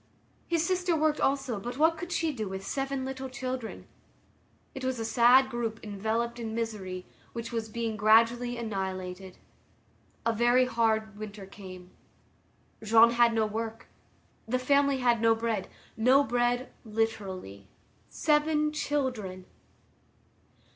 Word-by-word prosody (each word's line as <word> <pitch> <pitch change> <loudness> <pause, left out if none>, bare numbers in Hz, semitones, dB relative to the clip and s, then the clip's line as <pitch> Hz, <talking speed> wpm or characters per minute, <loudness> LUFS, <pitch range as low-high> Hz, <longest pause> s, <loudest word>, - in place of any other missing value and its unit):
His 335 -1 +1
sister 365 -1 +1
worked 310 -1 +1
also 270 -5 0
but 245 +5 -6
what 320 +2 +4
could 345 +2 -7
she 325 -3 0
do 215 -6 -4
with 190 0 -6
seven 270 +1 -2
little 265 0 -5
children? 255 -2 -5 0.9
It 265 - -7
was 260 -1 -1
a 225 - -3
sad 245 +4 +5
group 230 -2 -3
enveloped 220 +3 -2
in 225 -1 -4
misery, 195 -6 -4 0.3
which 230 0 -5
was 225 -2 -3
being 230 -1 -3
gradually 230 +3 +4
annihilated. 190 -4 -5 0.9
A 230 - +2
very 240 +3 +4
hard 220 -3 0
winter 210 -2 -7
came. 185 -2 -11 0.9
Jean 225 +2 +6
had 235 -1 +4
no 220 -1 +2
work. 225 +1 -5 0.6
The 250 +3 +1
family 280 +2 +3
had 240 -3 +2
no 225 0 +5
bread. 225 -4 -2 0.3
No 255 +5 +5
bread 245 0 0
literally. 195 - -3 0.4
Seven 300 0 +2
children! 250 -12 -2
230 Hz, 130 wpm, -29 LUFS, 215-260 Hz, 0.9 s, Jean